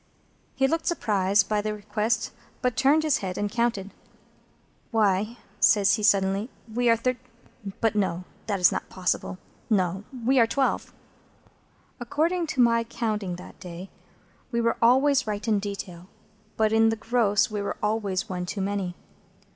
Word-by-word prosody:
He 270 0 +3
looked 325 +3 -1
surprised 200 - +2
by 210 -1 +1
the 215 0 -3
request, 210 +2 -1 0.3
but 250 -2 +1
turned 280 +4 +3
his 310 -3 +2
head 185 -2 -4
and 205 0 -2
counted. 225 -4 -1 1.0
"Why," 215 0 +1 0.2
says 205 -1 +5
he, 215 - 0
suddenly, 200 +1 +2 0.2
"we 245 +1 +2
are 230 - +6
Thirt—; 255 +2 -1 0.6
but 225 -1 +2
no, 185 -4 -1 0.3
it's 195 -3 +4
not - - -4
possible. 185 0 -2 0.3
No. 190 -2 +1 0.2
We 265 +1 +4
are 230 - +5
twelve." 270 +3 0 1.1
According 325 +8 0
to 310 -5 +1
my 230 -1 +4
counting 215 -5 -3
that 180 - -12
day, 180 0 -9 0.6
we 235 - 0
were 230 0 +1
always 265 +2 +4
right 210 +2 -3
in 215 -2 +3
detail, 190 -3 -6 0.5
but 220 0 +2
in 225 0 +5
the 225 - 0
gross 220 -2 +1
we 210 -1 -2
were 200 - -3
always 205 -4 -1
one 180 -1 -4
too 195 +3 -4
many. 195 -2 -2
215 Hz, 155 wpm, -26 LUFS, 195-235 Hz, 1.1 s, are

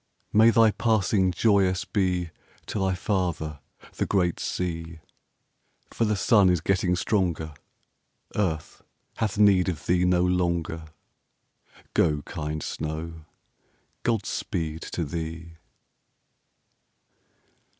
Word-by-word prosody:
May 110 +2 +7
thy 115 -1 +5
passing 105 -4 +2
joyous 95 -2 +2
be 90 -4 0 0.3
To - - -3
thy 95 -1 +1
father, 85 -6 -2 0.4
the - - 0
great 90 -4 +1
sea, 85 -2 -3 0.9
For 115 - 0
the 105 0 +1
sun 100 -1 +4
is 90 -1 +3
getting 90 +1 +1
stronger; 85 -5 0 0.8
Earth 80 -7 -2 0.4
hath 105 -2 -1
need 100 -3 +5
of 80 -5 -5
thee 90 0 +2
no 90 0 +3
longer; 85 -3 0 1.1
Go, 75 -4 +2
kind 75 +1 -4
snow, 80 +1 -5 0.8
God 115 -4 0
speed 80 -1 -3
to 85 - -2
thee! 80 +2 -6
90 Hz, 105 wpm, -26 LUFS, 80-100 Hz, 1.1 s, May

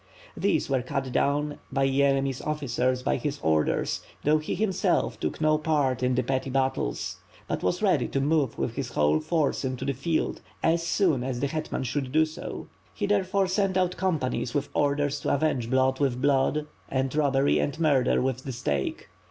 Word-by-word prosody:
These - - +1
were 135 -2 +1
cut 135 0 -3
down 145 +3 0
by 135 -1 +2
Yeremy's 135 -1 +1
officers 130 -4 -1
by - - +1
his 145 -1 -3
orders, 80 -1 +1 0.2
though 155 +1 +4
he, 155 - -3
himself, 195 -2 0
tok 75 - -3
no 155 -1 +3
part 145 -5 +1
in 125 0 +1
the 130 - +1
petty 135 0 -1
battles; 130 - -1 0.3
but - - -2
was - - -1
ready - - +3
to 135 - -1
move 140 -3 +1
with 115 - -2
his 125 -3 -3
whole 75 +1 +3
force 155 - 0
into 130 0 -3
the 140 - 0
field, 155 +5 -1 0.2
as 165 +1 +3
soon 165 -6 +1
as 130 -2 -3
the 140 - 0
hetman 155 -1 -3
should 130 +1 -2
do 155 +2 +4
so. 155 0 -7 0.3
He 205 - -1
therefore 200 -1 +2
sent 190 0 +1
out 180 -1 +1
companies 150 -10 -1
with 145 0 -1
orders 145 0 +1
to - - +1
avenge 135 -5 0
blood 130 0 +2
with 135 -4 +1
blood, 145 +2 +2 0.2
and 130 +1 -1
robbery 140 -2 +3
and 145 +2 -2
murder 140 -6 +3
with 130 0 -1
the 135 - -5
stake. 70 - -2
140 Hz, 185 wpm, -27 LUFS, 130-155 Hz, 0.3 s, though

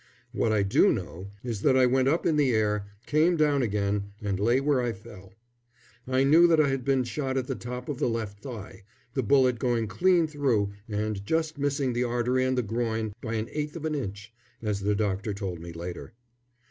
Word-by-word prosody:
What 110 - 0
I 105 -2 +2
do 100 - +4
know 90 +2 -5
is 115 -5 -4
that 130 +2 +4
I 130 - +6
went 130 +1 +2
up 160 +5 +1
in 160 - +3
the 145 -3 +3
air, 105 -2 0 0.2
came 165 +4 +3
down 145 -3 +3
again, 100 -2 -1
and 100 -4 -2
lay 120 +5 +3
where 140 -2 +2
I 120 -1 -1
fell. 105 -4 -13 0.8
I 130 +1 +2
knew 160 +5 +6
that 165 -2 +4
I 150 -2 +4
had 135 -1 -1
been 135 0 +2
shot 130 +3 -3
at 130 - 0
the 135 - -3
top 125 0 -6
of 145 -4 -4
the - - +1
left 110 -3 -4
thigh, 115 -6 -8 0.3
the 130 - 0
bullet 125 0 +3
going 120 -2 +1
clean 175 - +3
through 135 -10 0 0.2
and 105 -1 -2
just 160 +5 -1
missing 140 -2 0
the 120 +1 0
artery 120 +2 +1
and 130 0 0
the 125 - +2
groin 110 -1 -2
by 115 -1 -3
an 110 0 -2
eighth 150 +1 -3
of 160 -2 -5
an 155 - -1
inch, 100 -5 -5 0.3
as 105 -3 -2
the 100 +1 0
doctor 100 0 -1
told 95 -4 -4
me 85 0 -8
later. 85 +6 -7
120 Hz, 210 wpm, -27 LUFS, 105-135 Hz, 0.8 s, I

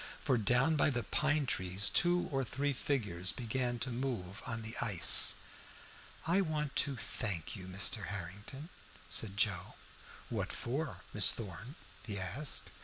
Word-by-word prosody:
For 135 - +1
down 125 +8 +2
by 150 - +4
the 120 -4 -2
pine 150 -1 +1
trees 95 -3 0
two 175 0 +3
or 135 -1 0
three 140 +4 -1
figures 105 -10 0
began 120 0 -2
to 130 - -5
move 115 -6 -4
on 120 -2 -4
the 110 +1 -5
ice. 95 -7 +7 0.9
"I 175 +5 +3
want 155 -5 -2
to 140 -1 +2
thank 100 -8 -3
you, 95 -3 -8
Mr. 95 +2 0
Harrington," 105 - -7 0.4
said 100 -3 0
Joe. 100 -4 +1 0.5
"What - - -2
for, 135 +5 -3
Miss - - +6
Thorn?" 115 - -7 0.3
he 105 -3 -4
asked. 135 +10 -2
120 Hz, 145 wpm, -34 LUFS, 100-140 Hz, 0.9 s, ice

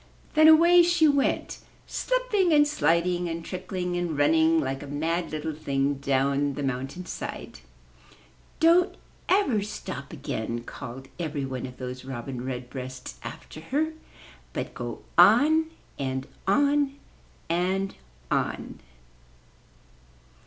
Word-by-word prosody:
Then 310 0 +7
away 340 +3 +8
she 345 -2 +4
went 285 -2 +1 0.3
slipping, - - +1
and 295 -1 +6
sliding, 175 - +1
and 165 0 -5
trickling, 180 -1 -4
and 175 -4 -2
running 160 +2 +4
like 135 -2 -2
a 145 - -8
mad 165 +5 -1
little 155 +1 -3
thing 140 -2 -1
down 140 +1 +1
the 145 - -4
mountain 135 +6 -3
side. - - -6 1.0
"Don't 345 +3 +4 0.3
ever 325 - +3
stop 185 -8 -6
again,'' 120 -5 -4
called 130 +3 -8
every 150 -4 -2
one 130 -1 -4
of 125 - -12
those 125 0 -6
Robin 130 -1 -6
Redbreasts 125 - -6
after - - -9
her, 300 - -1 0.6
''but - - -3
go - - -6 0.2
on 315 +2 +6
— - - -28
and 130 -1 -2 0.2
on 285 +6 +3 0.3
— - - -31
and 185 +3 0 0.4
on!" - - -2
165 Hz, 125 wpm, -26 LUFS, -, 1.0 s, away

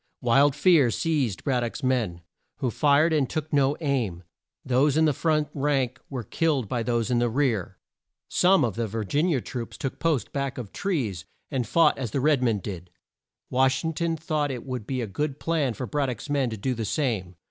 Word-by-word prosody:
Wild 135 +3 +4
fear 150 -4 +5
seized 135 - -1
Brad 130 -3 +1
dock's 120 +4 -4
men, 115 -10 0 0.3
who 125 - -2
fired 150 +5 +3
and 145 -5 +1
took 155 -1 -4
no 140 0 +3
aim. 120 - -1 0.4
Those 135 +3 +3
in 160 - +4
the 150 - +3
front 150 0 +1
rank 135 -3 0
were 130 -4 -4
killed 140 0 0
by 120 +3 -1
those 120 0 0
in 120 - +3
the 120 0 +2
rear. 110 -8 0 0.5
Some 180 -5 +4
of 115 - -2
the 115 -1 -1
Vir 110 +1 -3
gin 145 - +1
i 175 - +2
a 130 - 0
troops 120 -1 -6
took 135 -2 -4
post 160 -7 0
back 140 -2 -2
of 115 -6 -6
trees, 125 - -2 0.3
and 125 -4 -1
fought 165 +6 +3
as 130 -4 -2
the 135 - -1
red 145 -1 +3
men 115 -4 +2
did. 90 -3 -7 0.6
Wash 130 +2 +2
ing 160 - -1
ton 165 +1 -1
thought 155 -2 -1
it 125 -3 -5
would 125 -5 -5
be 130 -2 -2
a - - -1
good 140 +8 -3
plan 150 -8 0
for 130 - -4
Brad 145 0 -1
dock's 125 +4 -6
men 140 -4 +1
to 110 - -5
do 130 +6 -1
the 115 -2 -3
same. 105 -7 -1
130 Hz, 215 wpm, -26 LUFS, 115-150 Hz, 0.6 s, fear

